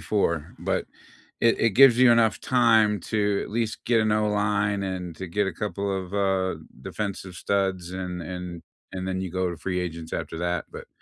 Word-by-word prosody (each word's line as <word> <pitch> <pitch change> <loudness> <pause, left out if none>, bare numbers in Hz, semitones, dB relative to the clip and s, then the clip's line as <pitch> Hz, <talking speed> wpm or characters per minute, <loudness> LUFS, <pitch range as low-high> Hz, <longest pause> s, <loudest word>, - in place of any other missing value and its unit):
4, 85 -3 -1
but - - -1 0.6
it 115 - +3
it 115 - +4
gives 125 +2 +7
you 130 -2 +7
enough 115 -2 +3
time 110 -5 +3
to, 105 +1 0
at - - -8
least, 115 0 -1
get 120 -2 +3
an 110 -1 +2
O 105 0 +2
line, 105 -1 +1
and 90 -3 -4
to 95 - -6
get 100 +4 0
a 95 - -2
couple 100 +2 -3
of, 95 -1 -6
uh, 95 -2 +1 0.3
defensive 100 -1 -5
studs, 95 -1 -1
and 90 -1 -4
and 90 0 -6 0.3
and 95 -1 -4
then 95 0 -2
you 95 -1 -4
go 90 0 -1
to 85 - -6
free 90 +1 -2
agents 85 -2 -5
after 80 - -4
that. 85 -1 -1
But, - - -9
95 Hz, 195 wpm, -25 LUFS, 90-105 Hz, 0.6 s, gives